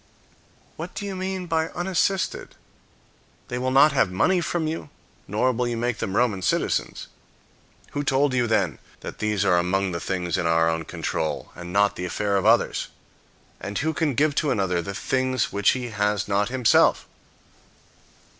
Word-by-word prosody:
What -, -, -7 dB
do 205 Hz, -, -4 dB
you 195 Hz, -1 st, -4 dB
mean 185 Hz, 0 st, -3 dB
by 160 Hz, -1 st, 0 dB
unassisted? 185 Hz, +1 st, -1 dB, 0.9 s
They 125 Hz, -, -3 dB
will 130 Hz, +1 st, 0 dB
not 140 Hz, +4 st, +6 dB
have 135 Hz, -8 st, +2 dB
money 180 Hz, -, +2 dB
from 170 Hz, -1 st, -1 dB
you, 155 Hz, -1 st, -4 dB, 0.4 s
nor 110 Hz, +6 st, +1 dB
will 125 Hz, 0 st, -1 dB
you 120 Hz, -1 st, -2 dB
make 120 Hz, -1 st, -1 dB
them 95 Hz, -2 st, -3 dB
Roman 110 Hz, -6 st, +1 dB
citizens. -, -, -1 dB, 0.9 s
Who 145 Hz, -, -2 dB
told 140 Hz, 0 st, +2 dB
you, 125 Hz, -2 st, +1 dB
then, 115 Hz, -, 0 dB, 0.2 s
that -, -, -8 dB
these 105 Hz, -2 st, 0 dB
are 90 Hz, -3 st, +4 dB
among 95 Hz, +2 st, 0 dB
the 85 Hz, -, -3 dB
things 90 Hz, -1 st, -2 dB
in 85 Hz, -, 0 dB
our 80 Hz, 0 st, +3 dB
own 80 Hz, 0 st, -1 dB
control, 80 Hz, +1 st, -3 dB
and 85 Hz, 0 st, -9 dB
not 100 Hz, +1 st, +2 dB
the 90 Hz, -, -3 dB
affair 100 Hz, +3 st, -1 dB
of 95 Hz, -, +1 dB
others? -, -, +3 dB, 0.7 s
And 100 Hz, +1 st, -5 dB
who 160 Hz, +2 st, 0 dB
can 155 Hz, -6 st, 0 dB
give 150 Hz, +2 st, +2 dB
to 150 Hz, -, +1 dB
another 95 Hz, -8 st, 0 dB
the 100 Hz, +3 st, -6 dB
things 130 Hz, +2 st, 0 dB
which 100 Hz, 0 st, +2 dB
he 125 Hz, -1 st, -5 dB
has 105 Hz, -1 st, 0 dB
not 100 Hz, +2 st, +1 dB
himself? 125 Hz, -2 st, +3 dB
115 Hz, 175 wpm, -24 LUFS, 95-145 Hz, 0.9 s, not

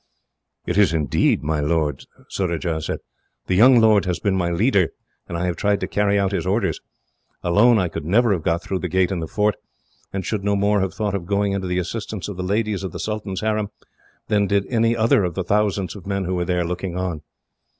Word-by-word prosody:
"It 90 Hz, +3 st, 0 dB
is 100 Hz, -5 st, +4 dB
indeed, 75 Hz, -3 st, +1 dB
my 75 Hz, +1 st, 0 dB
lord," 75 Hz, -2 st, 0 dB, 0.2 s
Surajah 85 Hz, -3 st, -2 dB
said. -, -, -4 dB, 0.4 s
"The -, -, -1 dB
young 120 Hz, +6 st, +7 dB
lord 110 Hz, -3 st, +4 dB
has 90 Hz, -2 st, -1 dB
been 100 Hz, -2 st, 0 dB
my 90 Hz, -2 st, 0 dB
leader, 95 Hz, 0 st, +2 dB, 0.4 s
and 85 Hz, -, -3 dB
I 85 Hz, -, -1 dB
have 90 Hz, -1 st, -2 dB
tried 105 Hz, 0 st, +1 dB
to -, -, -1 dB
carry 100 Hz, 0 st, +1 dB
out 100 Hz, -1 st, +1 dB
his 100 Hz, -, -1 dB
orders. 100 Hz, +1 st, 0 dB, 0.6 s
Alone, 110 Hz, +7 st, +5 dB
I 90 Hz, -3 st, +1 dB
could 80 Hz, -, -6 dB
never 110 Hz, +8 st, +3 dB
have 90 Hz, -, -2 dB
got 85 Hz, +2 st, 0 dB
through 95 Hz, -, -2 dB
the 90 Hz, -, -3 dB
gate 95 Hz, +2 st, +1 dB
in 95 Hz, -, -1 dB
the 80 Hz, -, -4 dB
fort, 105 Hz, +3 st, 0 dB, 0.5 s
and 95 Hz, -1 st, -4 dB
should 105 Hz, -3 st, -2 dB
no 100 Hz, 0 st, +1 dB
more 100 Hz, +1 st, +2 dB
have 95 Hz, -, -2 dB
thought 105 Hz, -2 st, -1 dB
of 90 Hz, -4 st, -3 dB
going 100 Hz, 0 st, +1 dB
to 95 Hz, -, -4 dB
the 90 Hz, 0 st, -1 dB
assistance 105 Hz, +2 st, -4 dB
of 100 Hz, -, -6 dB
the -, -, -3 dB
ladies 105 Hz, +1 st, -1 dB
of 95 Hz, -, -5 dB
the -, -, -6 dB
Sultan's 105 Hz, -3 st, -3 dB
harem 110 Hz, -1 st, 0 dB, 0.6 s
than 105 Hz, -1 st, +2 dB
did 100 Hz, 0 st, +1 dB
any 115 Hz, 0 st, +2 dB
other 110 Hz, -2 st, +3 dB
of 90 Hz, -2 st, -2 dB
the 95 Hz, -, -1 dB
thousands 100 Hz, 0 st, 0 dB
of 100 Hz, -2 st, -11 dB
men 100 Hz, -1 st, -1 dB
who 90 Hz, -, -2 dB
were 90 Hz, -1 st, -1 dB
there, 90 Hz, -1 st, 0 dB
looking 90 Hz, +1 st, -4 dB
on." 90 Hz, -4 st, -3 dB
95 Hz, 225 wpm, -22 LUFS, 90-105 Hz, 0.6 s, young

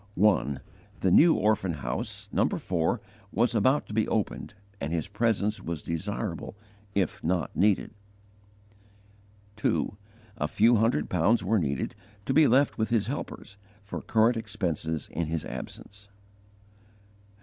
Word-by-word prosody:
1. 90 Hz, -8 st, +3 dB, 0.4 s
The 95 Hz, -, +3 dB
new 165 Hz, -, +7 dB
orphan 105 Hz, -4 st, +1 dB
house, 65 Hz, -5 st, -4 dB
No. -, -, +2 dB
4, 90 Hz, +5 st, 0 dB, 0.3 s
was 120 Hz, +3 st, +2 dB
about 130 Hz, +6 st, +3 dB
to -, -, -9 dB
be 110 Hz, 0 st, +1 dB
opened, 105 Hz, -1 st, -2 dB, 0.2 s
and 70 Hz, -, -3 dB
his 85 Hz, -2 st, -1 dB
presence 105 Hz, 0 st, 0 dB
was 85 Hz, -3 st, -5 dB
desirable 85 Hz, +3 st, -3 dB, 0.4 s
if 95 Hz, -2 st, 0 dB
not 85 Hz, -3 st, -1 dB
needful. 100 Hz, +2 st, +2 dB, 1.6 s
2. 105 Hz, -, 0 dB, 0.4 s
A 75 Hz, -, +1 dB
few 115 Hz, +8 st, +4 dB
hundred 110 Hz, -8 st, +2 dB
pounds 100 Hz, +5 st, +2 dB
were 105 Hz, +3 st, +2 dB
needed, 70 Hz, -5 st, -2 dB, 0.3 s
to 135 Hz, -, 0 dB
be 155 Hz, 0 st, +6 dB
left 135 Hz, +2 st, +3 dB
with 110 Hz, -, +1 dB
his 115 Hz, -3 st, +2 dB
helpers, 115 Hz, -5 st, -6 dB, 0.3 s
for 100 Hz, -, -6 dB
current 115 Hz, +2 st, +3 dB
expenses 90 Hz, -8 st, -3 dB
in 85 Hz, +1 st, -2 dB
his 80 Hz, 0 st, -2 dB
absence. 100 Hz, 0 st, -9 dB
100 Hz, 135 wpm, -28 LUFS, 85-110 Hz, 1.6 s, new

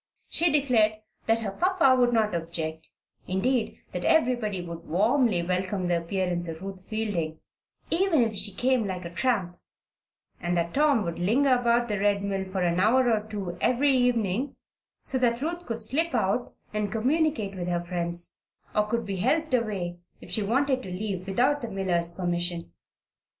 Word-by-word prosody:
She 340 Hz, -1 st, +2 dB
declared 250 Hz, -7 st, +3 dB, 0.3 s
that 225 Hz, 0 st, +3 dB
her 205 Hz, -3 st, -2 dB
papa 345 Hz, -, +3 dB
would 245 Hz, -1 st, +3 dB
not 220 Hz, -3 st, +2 dB
object 160 Hz, -1 st, -4 dB, 0.4 s
indeed, 225 Hz, +6 st, 0 dB
that -, -, -4 dB
everybody 240 Hz, -, +2 dB
would 170 Hz, -1 st, -7 dB
warmly 215 Hz, -, +2 dB
welcome 185 Hz, +2 st, -1 dB
the 175 Hz, -1 st, +2 dB
appearance 175 Hz, 0 st, -2 dB
of 165 Hz, +2 st, -7 dB
Ruth 195 Hz, -1 st, -7 dB
Fielding 185 Hz, -8 st, -2 dB, 0.5 s
"even 335 Hz, -6 st, +3 dB
if 225 Hz, -1 st, -1 dB
she 200 Hz, 0 st, +1 dB
came 250 Hz, +4 st, +1 dB
like 185 Hz, -2 st, -4 dB
a 170 Hz, -, -6 dB
tramp 185 Hz, -4 st, 0 dB, 0.4 s
"; -, -, -40 dB
and 175 Hz, 0 st, 0 dB
that 170 Hz, 0 st, -1 dB
Tom 285 Hz, -6 st, +3 dB
would 170 Hz, -2 st, -4 dB
linger 255 Hz, +9 st, +3 dB
about 240 Hz, -1 st, +2 dB
the 210 Hz, -3 st, -1 dB
Red 200 Hz, 0 st, +2 dB
Mill 195 Hz, -1 st, -2 dB
for 190 Hz, -1 st, -2 dB
an 175 Hz, 0 st, +1 dB
hour 240 Hz, +5 st, +4 dB
or 215 Hz, -1 st, 0 dB
two 195 Hz, -5 st, -4 dB
every 275 Hz, +3 st, +3 dB
evening 245 Hz, 0 st, +1 dB, 0.5 s
so 260 Hz, -, 0 dB
that 235 Hz, -2 st, +2 dB
Ruth 345 Hz, +5 st, -4 dB
could 230 Hz, -1 st, -3 dB
slip 310 Hz, +7 st, +1 dB
out 220 Hz, +2 st, 0 dB, 0.2 s
and 210 Hz, -2 st, -1 dB
communicate 255 Hz, -2 st, +1 dB
with 180 Hz, -2 st, -4 dB
her 175 Hz, -1 st, -1 dB
friends, 175 Hz, -1 st, -3 dB, 0.3 s
or 210 Hz, 0 st, +2 dB
could 230 Hz, +1 st, -1 dB
be 195 Hz, -1 st, -3 dB
helped 295 Hz, -, +1 dB
away 195 Hz, -8 st, -1 dB, 0.2 s
if -, -, -12 dB
she 210 Hz, -, +1 dB
wanted 260 Hz, +5 st, +1 dB
to 190 Hz, -, -8 dB
leave 185 Hz, 0 st, -4 dB
without 260 Hz, +9 st, +2 dB
the 235 Hz, -, -4 dB
miller's 180 Hz, -4 st, 0 dB
permission. 175 Hz, -, -2 dB
210 Hz, 175 wpm, -27 LUFS, 180-250 Hz, 0.5 s, hour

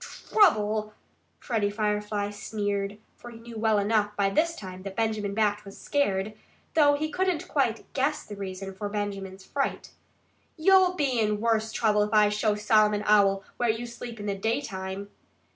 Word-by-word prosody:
"Trouble!" 215 Hz, -, +3 dB, 0.4 s
Freddie 220 Hz, -5 st, -1 dB
Firefly 210 Hz, -1 st, -1 dB
sneered, 205 Hz, -1 st, -3 dB, 0.2 s
for 240 Hz, -, -11 dB
he 235 Hz, -, -11 dB
knew 230 Hz, -1 st, -9 dB
well 220 Hz, -1 st, +3 dB
enough 210 Hz, 0 st, +1 dB
by 200 Hz, -1 st, +1 dB
this 330 Hz, +7 st, +1 dB
time 185 Hz, -, -8 dB
that 195 Hz, 0 st, -7 dB
Benjamin 215 Hz, -3 st, -1 dB
Bat 210 Hz, -1 st, +1 dB
was 195 Hz, -1 st, -11 dB
scared, 210 Hz, -8 st, 0 dB, 0.4 s
though 290 Hz, -2 st, +5 dB
he 310 Hz, +2 st, -2 dB
couldn't 370 Hz, -4 st, -1 dB
quite 235 Hz, -6 st, 0 dB
guess 280 Hz, +3 st, 0 dB
the 210 Hz, -, -9 dB
reason 195 Hz, -1 st, -6 dB
for 205 Hz, +2 st, -5 dB
Benjamin's 195 Hz, -2 st, -5 dB
fright. 275 Hz, -1 st, -3 dB, 0.7 s
"You'll 370 Hz, +2 st, +5 dB
be 275 Hz, -7 st, 0 dB
in 210 Hz, -1 st, +1 dB
worse 220 Hz, -1 st, +1 dB
trouble 210 Hz, -2 st, +2 dB
if 210 Hz, +1 st, -1 dB
I 210 Hz, -1 st, +6 dB
show 210 Hz, 0 st, +1 dB
Solomon 210 Hz, 0 st, +3 dB
Owl 195 Hz, -2 st, +4 dB
where 240 Hz, -1 st, +1 dB
you 225 Hz, +2 st, -1 dB
sleep 235 Hz, -1 st, -8 dB
in 205 Hz, -, -6 dB
the 200 Hz, -, -1 dB
daytime." 195 Hz, -2 st, -3 dB
210 Hz, 165 wpm, -27 LUFS, 205-235 Hz, 0.7 s, I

